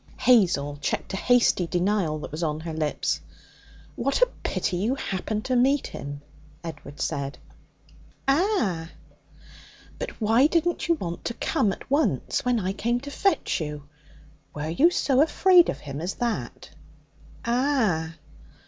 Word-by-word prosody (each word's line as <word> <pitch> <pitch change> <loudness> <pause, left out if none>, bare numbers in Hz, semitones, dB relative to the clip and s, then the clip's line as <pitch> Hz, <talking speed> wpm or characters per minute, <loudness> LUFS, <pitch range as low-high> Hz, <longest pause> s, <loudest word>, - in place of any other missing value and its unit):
Hazel 170 - +3
checked - - -2
a - - -1
hasty 235 -6 +3
denial 180 -3 0
that - - -7
was 155 +3 -5
on 155 -2 -1
her 165 0 -5
lips. 155 -2 -1 0.7
'What 275 - 0
a - - +3
pity 180 - -1
you 220 +8 0
happened 210 -3 -3
to 255 - 0
meet 270 +3 +3
him!' 145 0 -7 0.4
Edward 150 -3 -8
said. 140 0 -2 0.9
'Ah!' 270 - +1 1.1
'But - - -3
why 225 +5 +4
didn't 340 +1 0
you 335 - +4
want 175 - -5
to 235 - -2
come 250 -9 +1
at - - -8
once 280 - +1
when 245 -2 +2
I 190 -1 -2
came 235 +4 0
to 285 +1 -8
fetch 390 - 0
you? 150 -2 -5 0.7
Were 150 +1 -3
you 275 - +4
so 275 -6 +2
afraid 355 +3 +5
of - - -4
him 140 +1 -6
as 180 +3 -3
that?' 240 -2 -3 0.7
'Ah!' 235 - +1
210 Hz, 145 wpm, -25 LUFS, 160-270 Hz, 1.1 s, afraid